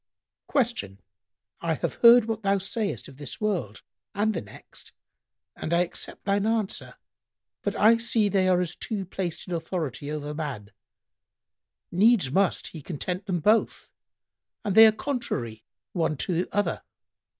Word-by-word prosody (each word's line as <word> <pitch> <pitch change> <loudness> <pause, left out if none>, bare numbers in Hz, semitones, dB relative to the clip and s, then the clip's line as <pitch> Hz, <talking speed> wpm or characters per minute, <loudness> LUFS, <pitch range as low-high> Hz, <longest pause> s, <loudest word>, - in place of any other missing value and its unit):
Q 235 - 0 0.6
"I 165 -1 0
have - - -3
heard 235 -1 +8
what 225 -1 -3
thou 200 -1 +2
sayest 200 +2 -3
of 135 - -14
this 145 -2 -8
world 180 - -2 0.3
and 215 +2 +1
the 175 - -3
next 100 - -13 0.6
and 155 - -5
I 170 +1 +4
accept 175 - -4
thine 200 +1 +1
answer; 220 -3 -2 0.7
but - - -2
I 225 +2 +5
see 230 -2 +3
they 195 -2 +2
are 180 -1 +4
as 175 -1 -2
two 205 -4 -4
placed 180 -1 -4
in 180 - -4
authority 160 -5 -3
over 150 -1 -4
man; 135 -10 -5 1.2
needs 195 - +4
must 190 +4 +1
he 160 - -9
content 180 +6 -4
them 175 -3 -1
both, 215 +6 +1 0.7
and 200 - 0
they 220 +2 +10
are - - +5
contrary 215 - -4 0.3
one 160 -4 0
to 175 +4 -1
other. 205 0 0
185 Hz, 150 wpm, -26 LUFS, 155-215 Hz, 1.2 s, they